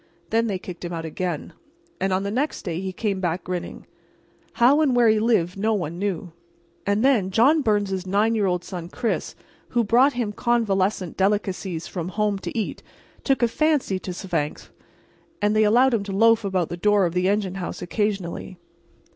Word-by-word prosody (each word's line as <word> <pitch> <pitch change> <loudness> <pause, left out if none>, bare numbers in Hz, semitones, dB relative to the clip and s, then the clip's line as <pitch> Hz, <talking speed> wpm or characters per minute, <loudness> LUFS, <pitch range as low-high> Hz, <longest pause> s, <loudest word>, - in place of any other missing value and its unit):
Then 230 +1 +2
they 200 -3 -1
kicked 180 -2 -9
him 175 - -4
out 165 -1 -4
again, 165 0 -4 0.5
and 190 0 0
on 185 +1 +1
the 200 - -2
next 275 +7 -1
day 170 +1 -3
he 190 0 -3
came 195 +1 -2
back 175 -1 -2
grinning. 180 -1 -5 0.7
How 265 +6 +4
or 310 - +4
where 245 -3 +4
he 215 -1 +4
lived 195 -5 +1
no 220 +2 +2
one 170 -3 -4
knew. 185 -3 -3 0.6
And 205 +4 +2
then 230 -9 +3
John 265 +11 +4
Byrnes's 200 -5 0
nine 210 +4 +2
year 210 -3 +1
old 180 -1 0
son, 180 -2 -7
Chris, 235 +3 -2 0.3
who 240 -1 +1
brought 245 +6 +4
him 240 -4 -2
convalescent 200 -6 0
delicacies 190 -3 -1
from 175 -3 -5
home 210 0 0
to - - -6
eat, 220 - -3 0.4
took 270 -3 +1
a - - +5
fancy 275 -6 +1
to 185 - -8
Svangvsk, 170 -5 -3 0.7
and 210 +1 +1
they 215 - +4
allowed 245 +5 +4
him 220 -4 +1
to 200 - -5
loaf 225 +3 +4
about 190 -4 -1
the 175 - -5
door 205 +1 +3
of 170 - -2
the 180 +1 +1
engine 200 -2 0
house 180 - -5
occasionally. 190 -2 -3
200 Hz, 190 wpm, -24 LUFS, 180-225 Hz, 0.7 s, a